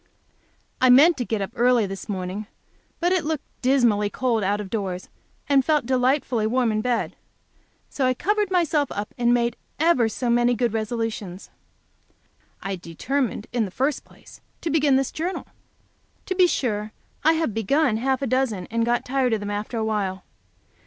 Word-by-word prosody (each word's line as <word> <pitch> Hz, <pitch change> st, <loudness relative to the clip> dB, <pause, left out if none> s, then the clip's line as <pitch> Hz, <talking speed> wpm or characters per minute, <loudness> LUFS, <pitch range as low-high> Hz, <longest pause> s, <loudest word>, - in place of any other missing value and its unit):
I 255 Hz, -, +5 dB
meant 295 Hz, +7 st, +7 dB
to 245 Hz, -, -2 dB
get 220 Hz, -3 st, -1 dB
up 195 Hz, -, -6 dB
early 240 Hz, -2 st, +3 dB
this 195 Hz, +1 st, -7 dB
morning, 190 Hz, +1 st, -4 dB, 0.5 s
but 350 Hz, +1 st, +1 dB
it 370 Hz, -3 st, +2 dB
looked 310 Hz, -2 st, -2 dB, 0.2 s
dismally 240 Hz, -6 st, +3 dB
cold 235 Hz, -2 st, 0 dB
out 200 Hz, +2 st, +1 dB
of 200 Hz, -2 st, -6 dB
doors, 190 Hz, -5 st, -3 dB, 0.4 s
and 275 Hz, -2 st, +4 dB
felt 300 Hz, -2 st, +1 dB
delightfully 255 Hz, -3 st, +1 dB
warm 245 Hz, 0 st, +1 dB
in 215 Hz, 0 st, 0 dB
bed. 240 Hz, 0 st, -1 dB, 0.7 s
So 265 Hz, -3 st, -1 dB
I 255 Hz, -, +1 dB
covered 415 Hz, +6 st, 0 dB
myself 325 Hz, -6 st, +1 dB
up, 205 Hz, +1 st, -5 dB
and 240 Hz, -1 st, +2 dB
made 240 Hz, -1 st, +1 dB, 0.2 s
ever 300 Hz, -8 st, +3 dB
so 245 Hz, +3 st, -3 dB
many 240 Hz, +1 st, +3 dB
good 235 Hz, -1 st, 0 dB
resolutions. 220 Hz, -4 st, -4 dB, 1.1 s
I 195 Hz, -1 st, -3 dB
determined, 215 Hz, -, -2 dB
in 235 Hz, -3 st, +1 dB
the -, -, -6 dB
first 270 Hz, +9 st, -1 dB
place, -, -, -17 dB, 0.2 s
to 330 Hz, -, -2 dB
begin 295 Hz, -3 st, +3 dB
this 270 Hz, 0 st, +1 dB
Journal. 350 Hz, +4 st, -3 dB, 0.8 s
To 375 Hz, -, -1 dB
be 365 Hz, -1 st, +5 dB
sure, 215 Hz, -8 st, -2 dB, 0.3 s
I 320 Hz, -, +5 dB
have 320 Hz, -8 st, -1 dB
begun 225 Hz, +3 st, +1 dB
half 265 Hz, +3 st, 0 dB
a -, -, +1 dB
dozen, 235 Hz, -7 st, 0 dB
and 230 Hz, 0 st, +1 dB
got 240 Hz, +1 st, 0 dB
tired 255 Hz, -2 st, +1 dB
of 220 Hz, -, +1 dB
them 205 Hz, 0 st, -4 dB
after 210 Hz, +3 st, -4 dB
a 220 Hz, -, 0 dB
while. 195 Hz, -4 st, -2 dB
240 Hz, 175 wpm, -24 LUFS, 215-275 Hz, 1.1 s, meant